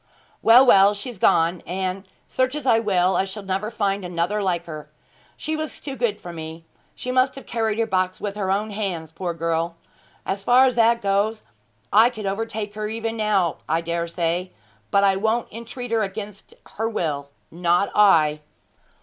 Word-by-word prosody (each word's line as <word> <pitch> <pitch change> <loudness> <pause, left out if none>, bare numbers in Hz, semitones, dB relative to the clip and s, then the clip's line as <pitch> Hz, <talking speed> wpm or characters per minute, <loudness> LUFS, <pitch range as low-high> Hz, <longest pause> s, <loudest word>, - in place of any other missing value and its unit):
Well, 240 +4 +7
well, 200 -3 +6
she's 210 +1 -7
gone; 165 0 +3
and 190 +1 -3 0.2
search 255 +2 0
as 300 -3 -5
I 230 -3 +4
will 190 -4 +2
I - - +2
shall 195 +2 -7
never 195 +2 -2
find 200 -3 -1
another 180 +4 -1
like 175 -3 -1
her! 155 -2 -8 0.5
She 315 0 -3
was 310 0 -5
too 275 -2 -6
good 220 -5 -1
for 175 - -9
me. 160 0 -8 0.3
She 250 - -4
must 255 +1 +2
have 270 - -10
carried 225 -2 -1
her 230 - +2
box 185 -3 -1
with 205 -1 -4
her 200 -2 -2
own 210 +3 0
hands, 185 -7 -3
poor 170 +1 -4
girl. 165 0 -1 0.5
As 195 +1 -2
far 245 +5 +5
as 255 - +2
that 230 -1 +3
goes, 205 +2 0 0.5
I 220 +4 +7
could 220 -4 -8
overtake 210 +1 -3
her 210 0 -4
even 225 0 -3
now, 205 -6 +1
I 165 +2 +1
dare 170 0 -2
say; 170 +2 -2 0.4
but 200 - +3
I 195 -1 +4
won't 220 +3 -1
entreat 235 +2 -7
her 225 -1 +2
against 205 0 -6 0.2
her 225 +1 0
will 145 -9 -3 0.2
not 175 +3 +1
I.' 155 -7 +4
200 Hz, 185 wpm, -23 LUFS, 175-225 Hz, 0.5 s, Well